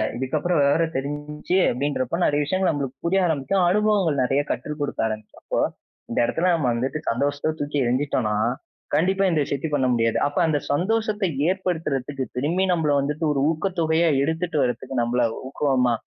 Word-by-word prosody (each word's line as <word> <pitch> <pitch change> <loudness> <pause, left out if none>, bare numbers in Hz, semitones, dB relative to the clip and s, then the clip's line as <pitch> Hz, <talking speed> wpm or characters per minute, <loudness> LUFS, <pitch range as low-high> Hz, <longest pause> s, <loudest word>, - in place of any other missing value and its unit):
இதுக்கப்பறம் 145 +6 0
விவரம் 160 +3 +2
தெரிஞ்சி 150 +4 -3
அப்பிடின்றப்போ 135 +2 -1
நிறைய 145 0 +2
விஷயங்கள் 185 +4 +1
நம்மளுக்கு 140 -3 -4
புரிய 190 +3 +3
ஆரம்பிக்கும். 170 +4 +1
அனுபவங்கள் 195 -8 +2
நிறைய 135 +3 +2
கற்றுக் 150 +4 -4
கொடுக்க 145 - -3
ஆரம்பிக்கறப்போ 110 -1 -4 0.5
இந்த - - 0
இடத்துல 170 +9 +1
நம்ம 155 -6 +1
வந்துட்டு 130 +6 -2
சந்தோஷத்த 145 +5 0
தூக்கி 145 0 -2
எறிஞ்சுட்டோன்னா, 125 -4 0 0.6
கண்டிப்பா 190 +6 +2
இந்த 165 -3 +1
விஷயத்தையும் 145 +2 -3
பண்ண 130 -3 +1
முடியாது. 115 -1 +1
அப்ப 145 - -6
அந்த 150 -2 +1
சந்தோஷத்தை 210 +5 0 0.2
ஏற்படுத்துறதுக்கு 150 -8 -2
திரும்பியும் 180 +7 +1
நம்மள 160 -3 +1
வந்துட்டு 150 +3 -1
ஒரு 140 - -1
ஊக்கத்தொகையா 165 0 +1
எடுத்துட்டு 160 +2 -1
வரதுக்கு 125 +1 -3
நம்மள 120 +1 +1 0.2
ஊக்கமா 130 -3 +1
150 Hz, 145 wpm, -23 LUFS, 135-170 Hz, 0.6 s, புரிய